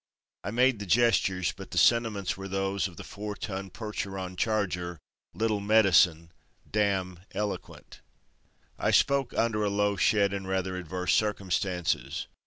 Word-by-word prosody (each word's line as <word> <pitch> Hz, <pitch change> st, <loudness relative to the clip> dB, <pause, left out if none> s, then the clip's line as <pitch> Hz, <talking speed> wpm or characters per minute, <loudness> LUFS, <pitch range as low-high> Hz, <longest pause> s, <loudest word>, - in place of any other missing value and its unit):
I 95 Hz, -, -3 dB
made 125 Hz, +1 st, +2 dB
the 100 Hz, -, -6 dB
gestures, 95 Hz, -4 st, +2 dB
but -, -, -10 dB
the -, -, -6 dB
sentiments 115 Hz, -5 st, +3 dB
were 95 Hz, 0 st, -7 dB
those 95 Hz, +1 st, -1 dB
of 90 Hz, -, -14 dB
the -, -, -7 dB
four 105 Hz, 0 st, -6 dB
ton 95 Hz, -3 st, -5 dB
Percheron 95 Hz, -3 st, -5 dB
charger, 90 Hz, -5 st, -1 dB, 0.4 s
Little 110 Hz, -2 st, 0 dB
Medicine, 90 Hz, -6 st, +4 dB, 0.4 s
dam 95 Hz, -4 st, 0 dB, 0.2 s
Eloquent. 105 Hz, -1 st, -5 dB, 0.8 s
I -, -, +1 dB
spoke 140 Hz, -2 st, +3 dB
under 115 Hz, -2 st, +1 dB
a 105 Hz, -, +1 dB
low 100 Hz, 0 st, +1 dB
shed 100 Hz, 0 st, +3 dB
and 95 Hz, -1 st, -4 dB
rather 95 Hz, -1 st, -1 dB
adverse 90 Hz, +1 st, -2 dB
circumstances. 95 Hz, -4 st, -1 dB
100 Hz, 140 wpm, -28 LUFS, 95-105 Hz, 0.8 s, Medicine